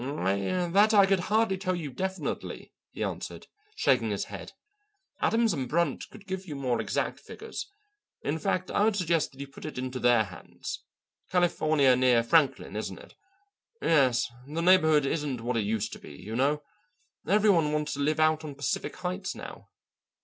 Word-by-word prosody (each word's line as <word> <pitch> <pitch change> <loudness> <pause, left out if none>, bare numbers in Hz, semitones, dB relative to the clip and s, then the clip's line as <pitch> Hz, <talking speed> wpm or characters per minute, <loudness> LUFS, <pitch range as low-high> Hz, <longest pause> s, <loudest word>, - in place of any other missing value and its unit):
"That 170 - +2
I 200 -1 +8
could 195 -1 +2
hardly 215 -3 +2
tell 185 -1 -1
you 155 -5 -5
definitely," 190 +6 -4 0.2
he - - -5
answered, - - -5 0.3
shaking 435 - +2
his - - -1
head. - - -9 0.7
"Adams 225 -2 +2
& 130 - -3
Brunt 170 +6 0
could 210 -2 -14
give 190 -1 -5
you 150 - -5
more 130 -3 0
exact - - -2
figures. - - -7 0.6
In 155 +3 -1
fact, 185 0 -1
I 205 - +2
would 220 -2 +2
suggest 170 -4 +1
that 135 - -18
you 140 - -4
put 135 - -13
it 155 - -6
into 130 0 -3
their 120 -2 +4
hands. 90 -3 -8 0.5
California 155 -6 +3
near 125 -2 +4
Franklin, 145 +4 +2
isn't - - -4
it? - - -14 0.7
Yes; 130 -6 +3 0.2
the 160 +3 -3
neighbourhood 160 -5 +5
isn't 145 -3 -1
what 120 +1 -2
it 110 - 0
used 110 0 -1
to - - -8
be, - - -11
you 100 +8 -7
know. 145 +4 +1 0.6
Every 210 +1 +5
one 165 -5 +2
wants 150 0 -1
to 145 - -5
live 150 +2 +1
out 155 0 +3
on 145 -2 -7
Pacific 140 -1 -2
Heights 185 +1 -4
now. - - -10
155 Hz, 175 wpm, -28 LUFS, 130-185 Hz, 0.7 s, I